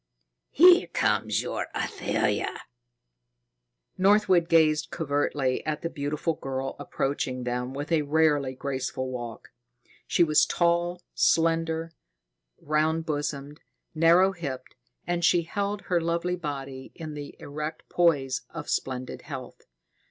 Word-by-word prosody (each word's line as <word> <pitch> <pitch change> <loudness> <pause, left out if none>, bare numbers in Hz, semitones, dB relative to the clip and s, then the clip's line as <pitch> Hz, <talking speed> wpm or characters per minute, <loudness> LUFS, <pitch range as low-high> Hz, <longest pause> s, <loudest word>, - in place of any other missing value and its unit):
Here 355 +3 +7
comes - - +1
your - - -3
Athalia!" - - -1 1.4
Northwood 190 -3 +4
gazed 155 -2 +4
covertly 145 -4 -1
at 155 -1 -3
the 165 - -2
beautiful 150 +2 -2
girl 135 -2 -4
approaching 130 -2 -2
them 125 +1 -3
with 145 +4 -5
a 160 -2 +3
rarely 145 -3 +2
graceful 130 -1 -3
walk. 120 -2 -7 0.6
She 175 - +4
was 155 -2 +4
tall, 175 +1 +1
slender, 165 0 +1 0.7
round 155 +2 0
bosomed, 145 -1 -3 0.3
narrow 170 +4 +5
hipped, 140 -8 -6 0.3
and 175 0 -1
she 170 0 +4
held 200 +4 -3
her 175 -3 +1
lovely 170 +2 -1
body 135 -5 -6
in 155 -2 -7
the 145 -1 -8
erect 150 +2 -6
poise 145 -7 +2
of - - -6
splendid 130 -1 -3
health. - - -9
155 Hz, 115 wpm, -27 LUFS, 140-170 Hz, 1.4 s, Here